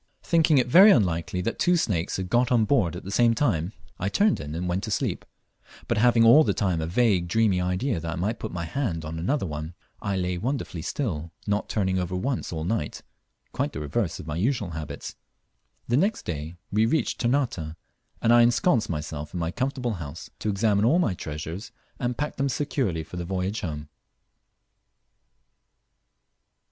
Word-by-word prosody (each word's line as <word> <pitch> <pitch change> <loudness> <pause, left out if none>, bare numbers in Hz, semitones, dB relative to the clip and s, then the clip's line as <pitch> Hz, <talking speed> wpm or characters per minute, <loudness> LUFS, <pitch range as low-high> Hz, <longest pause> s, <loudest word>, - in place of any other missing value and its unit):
Thinking 165 -3 +4
it 125 - +4
very 185 +12 +8
unlikely 90 - +2
that 115 +5 -3
two 175 0 +3
snakes 95 - -1
had 95 -1 -3
got 120 +6 +2
on 115 -3 +4
board 100 - +2
at 90 - -7
the 95 - -7
same 115 +2 +4
time, 100 - 0 0.3
I 95 - -1
turned 205 - +2
in 75 0 -6
and 90 +2 -3
went 90 +2 -1
to - - -5
sleep; - - -1 0.6
but - - +1
having 120 0 +5
all 140 +8 +8
the - - 0
time 90 -5 0
a 80 - -2
vague 95 -2 +2
dreamy 100 -1 +2
idea 90 +4 0
that 80 +1 -4
I - - -4
might 100 +6 -2
put 110 - -5
my 85 -1 -4
hand 85 - -2
on 80 +1 -5
another 115 - 0
one, 80 +1 -5 0.3
I 100 -1 -1
lay 90 -1 -1
wonderfully 120 - -3
still, 85 - -3
not 105 0 -1
turning 95 -3 0
over 90 0 -2
once 125 +7 -2
all 80 -2 -3
night, 85 -4 -2 0.5
quite - - -2
the - - -4
reverse 80 +6 -2
of - - -8
my 75 0 -4
usual 105 -2 0
habits. 75 -3 -6 0.7
The 120 - +2
next 200 +8 +1
day 80 0 -4 0.2
we 110 +2 +3
reached 160 +7 0
Ternate, 120 - 0 0.5
and 115 - +5
I 120 - +7
ensconced 120 +1 +3
myself 75 0 -5
in - - -2
my 85 0 -1
comfortable 130 0 -2
house, 75 +1 -8
to 110 - -2
examine 100 0 +2
all 130 +10 +4
my 170 - +2
treasures, 80 - -6 0.3
and 125 -1 -2
pack 150 +1 -3
them 140 0 +1
securely 125 - -1
for 80 +3 -9
the 90 - -3
voyage 95 +4 -2
home. 75 -3 -5
95 Hz, 190 wpm, -26 LUFS, 85-120 Hz, 0.7 s, very